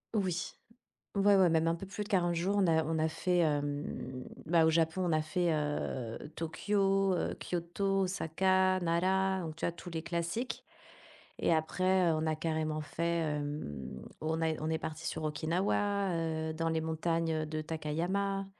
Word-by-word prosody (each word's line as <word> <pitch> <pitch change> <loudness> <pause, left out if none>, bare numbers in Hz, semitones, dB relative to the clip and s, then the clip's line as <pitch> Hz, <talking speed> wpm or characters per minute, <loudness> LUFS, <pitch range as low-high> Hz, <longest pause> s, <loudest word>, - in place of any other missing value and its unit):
Oui. 180 -4 -1 0.6
Ouais, 200 0 +5
ouais, 185 -3 +6
même 160 0 +3
un 165 - +2
peu 195 - -7
plus 205 +2 -4
de 205 - -12
40 175 -4 +2
jours, 185 +4 +1
on 195 - +4
a 160 -2 +3
on 160 0 0
a 160 0 +2
fait, 180 +3 0
hem, 145 -4 -1 0.2
bah, 165 0 +4
au 160 - +4
Japon, 165 +3 +2
on 175 - +1
a 155 0 +3
fait, 170 +1 +1
heu, 145 -6 -2 0.2
Tokyo, 195 +3 +1
heu, - - -1
Kyoto, 195 +3 -1
Osaka, 185 +1 +2
Nara, 190 +2 +2
donc 160 -2 -5
tu - - -11
vois - - +1
tous 175 +1 -10
les 165 -1 -3
classiques 170 +10 -3 0.7
et 170 - +3
après, 185 +3 +2
heu, - - +2
on 155 0 -1
a 155 -1 +1
carrément 155 -1 -1
fait, 170 +3 -1
hem, 145 - -4 0.2
on 160 +1 -1
a 160 -1 +1
on 155 - -1
est 160 - +1
parti 160 0 -5
sur - - -3
Okinawa, 185 +5 0 0.3
heu, - - -3
dans 165 +1 -1
les 160 -1 +1
montagnes, 165 +1 0
heu, 155 -1 0
de 155 0 -3
Takayama, 175 +6 -1
165 Hz, 180 wpm, -32 LUFS, 155-185 Hz, 0.7 s, ouais